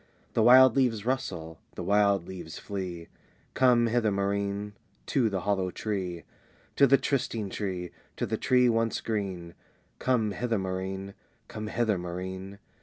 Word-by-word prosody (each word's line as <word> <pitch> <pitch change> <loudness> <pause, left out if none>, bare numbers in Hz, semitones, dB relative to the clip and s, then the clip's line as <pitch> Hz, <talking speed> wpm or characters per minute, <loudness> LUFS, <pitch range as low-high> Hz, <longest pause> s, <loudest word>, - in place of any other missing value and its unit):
"The - - +2
wild 130 +1 +8
leaves 120 -6 +1
rustle, 85 - -3 0.2
the - - -5
wild 100 -3 +2
leaves 90 -3 -8
flee 90 -4 -5 0.5
Come 125 -2 +4
hither, 115 -1 +2
Maurine, 100 +1 -1 0.3
to 125 -5 +2
the 95 -2 -2
hollow 95 -2 0
tree! 90 -4 -4 0.5
"To 140 - +7
the 135 +2 +6
trysting 120 -7 -2
tree, 90 -4 -4 0.3
to - - -1
the - - -1
tree 125 -1 +3
once 115 -1 +1
green, 95 -6 -4 0.5
Come 115 -5 +1
hither, 115 +1 -1
Maurine! 95 +1 -4 0.3
come 110 0 -6
hither, 110 -3 0
Maurine!"... 95 +2 -6
100 Hz, 140 wpm, -28 LUFS, 95-115 Hz, 0.5 s, wild